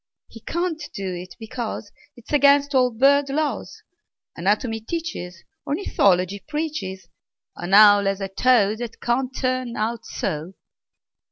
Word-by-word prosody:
He 225 Hz, -, -13 dB
can't 340 Hz, +5 st, -3 dB
do 190 Hz, -2 st, -3 dB
it, 180 Hz, +4 st, -8 dB
because 225 Hz, -2 st, -5 dB, 0.2 s
'T 240 Hz, -, -16 dB
is -, -, -8 dB
against 285 Hz, 0 st, +4 dB
all 255 Hz, -2 st, +4 dB
bird 275 Hz, +4 st, +3 dB
laws. 300 Hz, +2 st, -3 dB, 0.5 s
Anatomy 210 Hz, +5 st, 0 dB
teaches, 220 Hz, -, -6 dB, 0.2 s
Ornithology 200 Hz, -, +1 dB
preaches 295 Hz, -, -4 dB, 0.5 s
An 180 Hz, +3 st, 0 dB
owl 205 Hz, -1 st, +8 dB
has 195 Hz, 0 st, 0 dB
a 195 Hz, -, -3 dB
toe 215 Hz, 0 st, +3 dB
That 235 Hz, -1 st, -7 dB
can't 250 Hz, +2 st, 0 dB
turn 255 Hz, -2 st, -2 dB
out 225 Hz, +2 st, -2 dB
so! 160 Hz, +5 st, -4 dB
230 Hz, 135 wpm, -23 LUFS, 195-280 Hz, 0.5 s, owl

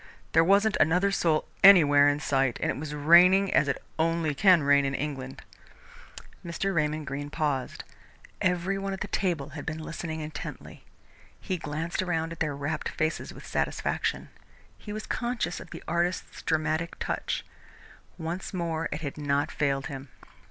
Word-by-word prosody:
There 165 Hz, -, +5 dB
wasn't 200 Hz, +4 st, +3 dB
another 180 Hz, +6 st, +3 dB
soul 160 Hz, -5 st, +1 dB, 0.2 s
anywhere 145 Hz, -7 st, +8 dB
in 145 Hz, 0 st, 0 dB
sight, 135 Hz, -4 st, +1 dB
and -, -, 0 dB
it -, -, -5 dB
was 150 Hz, +1 st, -5 dB
raining 180 Hz, +6 st, +6 dB
as 140 Hz, -, +4 dB
it 140 Hz, -, -1 dB, 0.2 s
only 165 Hz, -1 st, +1 dB
can 180 Hz, +1 st, +5 dB
rain 140 Hz, 0 st, +4 dB
in 135 Hz, 0 st, -1 dB
England." 135 Hz, -3 st, -5 dB, 1.0 s
Mr. 185 Hz, +3 st, -2 dB
Raymond 155 Hz, -2 st, 0 dB
Greene 145 Hz, +1 st, -5 dB
paused. 145 Hz, -5 st, -2 dB, 0.6 s
Every 185 Hz, +2 st, 0 dB
one 195 Hz, 0 st, -3 dB
at 190 Hz, -, -7 dB
the 205 Hz, -, -2 dB
table 170 Hz, -8 st, -1 dB
had 145 Hz, 0 st, -8 dB
been 160 Hz, 0 st, -4 dB
listening 160 Hz, 0 st, -5 dB
intently. 150 Hz, 0 st, -8 dB, 0.6 s
He 185 Hz, -, -3 dB
glanced 160 Hz, +4 st, -3 dB
around 165 Hz, -3 st, -1 dB
at 165 Hz, -, -8 dB
their 150 Hz, -3 st, -1 dB
rapt 150 Hz, +2 st, -3 dB
faces 155 Hz, +1 st, -2 dB
with -, -, -12 dB
satisfaction. -, -, -2 dB, 0.5 s
He 210 Hz, -, -10 dB
was 215 Hz, +1 st, -5 dB
conscious 240 Hz, -6 st, -2 dB
of -, -, -11 dB
the -, -, -9 dB
artist's 170 Hz, +1 st, -2 dB
dramatic 160 Hz, +1 st, -1 dB
touch. -, -, -3 dB, 0.7 s
Once 170 Hz, +3 st, -5 dB
more 165 Hz, -2 st, -2 dB
it 150 Hz, -, -4 dB
had 145 Hz, -1 st, -5 dB
not 145 Hz, -1 st, 0 dB
failed 135 Hz, -2 st, 0 dB
him. 135 Hz, 0 st, -7 dB
160 Hz, 160 wpm, -27 LUFS, 145-175 Hz, 1.0 s, anywhere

